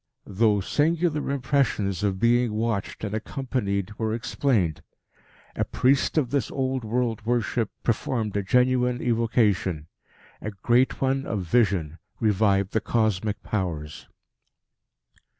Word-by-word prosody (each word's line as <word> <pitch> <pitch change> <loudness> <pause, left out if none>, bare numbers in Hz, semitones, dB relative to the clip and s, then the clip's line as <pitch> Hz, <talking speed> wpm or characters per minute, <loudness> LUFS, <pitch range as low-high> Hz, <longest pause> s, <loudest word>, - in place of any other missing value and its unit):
Those 105 -1 +1
singular 160 0 +1
impressions 130 - 0
of 100 -2 0
being 120 0 +3
watched 110 -2 -2
and 105 -1 -3
accompanied 110 -4 -3
were 110 -1 0
explained. 115 - 0 0.7
A - - 0
priest 135 +4 +1
of 130 -6 +1
this 140 -5 0
old 130 -2 -2
world 115 -1 -1
worship 115 -1 0
performed 110 -2 -1
a 100 - +1
genuine 125 +3 +2
evocation; 110 -9 +1 0.6
a 105 - -3
Great 120 +6 +1
One 135 +1 0
of 105 -4 -2
Vision 90 -5 +1 0.2
revived 100 -3 +2
the 110 - 0
cosmic 110 -2 0
Powers. 80 -7 -4
110 Hz, 115 wpm, -25 LUFS, 100-125 Hz, 0.7 s, being